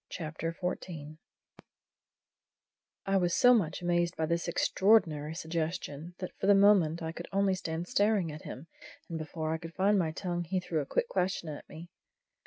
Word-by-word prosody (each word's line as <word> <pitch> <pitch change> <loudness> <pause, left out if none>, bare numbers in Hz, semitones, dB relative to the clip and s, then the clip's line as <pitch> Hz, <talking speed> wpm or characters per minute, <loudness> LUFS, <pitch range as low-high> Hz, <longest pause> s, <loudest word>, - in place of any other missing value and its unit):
CHAPTER 165 0 -4
XIV 180 -1 -1
DEAD - - -12
MAN'S 165 -3 -5
MONEY 155 +1 -11 1.9
I 195 0 +2
was 175 -2 +1
so 250 0 +7
much 180 -7 0
amazed 175 0 +1
by 160 - +1
this 170 +2 -1
extraordinary 165 -5 +2
suggestion, 165 -1 -4
that 185 - -5
for 195 - -1
the 200 - +7
moment 185 -5 +4
I 160 - -2
could 170 +1 -8
only 195 0 +2
stand 170 -2 -4
staring 205 -5 +2
at 150 - -8
him, 135 - -8 0.4
and 165 -1 -4
before 155 0 -3
I 160 - -2
could 165 +1 -9
find 200 +1 +3
my 160 -3 0
tongue 175 +1 -3
he 185 +3 -1
threw 170 -3 -2
a 140 - -6
quick - - 0
question 185 - -1
at 150 - -8
me. 165 +2 -10
170 Hz, 190 wpm, -31 LUFS, 160-190 Hz, 1.9 s, so